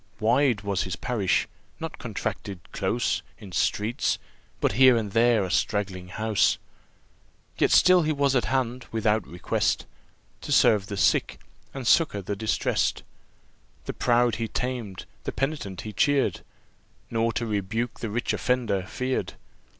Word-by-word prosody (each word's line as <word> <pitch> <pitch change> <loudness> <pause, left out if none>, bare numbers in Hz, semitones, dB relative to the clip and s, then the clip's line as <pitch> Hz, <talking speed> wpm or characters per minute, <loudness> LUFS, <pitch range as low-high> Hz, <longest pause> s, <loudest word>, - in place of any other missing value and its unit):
Wide 120 0 +3
was 100 -2 -1
his 95 -3 -3
parish, 100 0 0 0.3
not - - -6
contracted 95 -3 -4
close 120 +1 0 0.2
In 100 -4 -11
streets 110 +9 0 0.4
but - - +2
here 130 -1 +6
and 105 -3 -2
there 115 -1 +4
a 95 - -3
straggling 95 -3 -1
house. 110 +3 +1 1.0
Yet - - +4
still 185 -1 +6
he 155 -1 0
was 140 -2 +1
at 125 - +2
hand, 130 -1 -1
without 110 -1 +1
request, 90 - -1 0.6
To - - -6
serve 100 -3 +4
the 100 - -5
sick, - - +2 0.3
and 135 -2 -6
succour 110 - +3
the 100 +2 -3
distressed. 110 +2 0 0.8
The - - -4
proud 120 -2 +2
he 115 0 -2
tamed, 120 -5 -4 0.2
the - - -3
penitent 135 - -3
he 110 - -7
cheer'd, 145 +2 +2 0.7
Nor 115 0 +1
to 115 - -2
rebuke 110 +3 -2
the 115 - -4
rich 120 +4 -1
offender 120 -6 0
fear'd. 130 0 -2
115 Hz, 140 wpm, -26 LUFS, 100-125 Hz, 1.0 s, here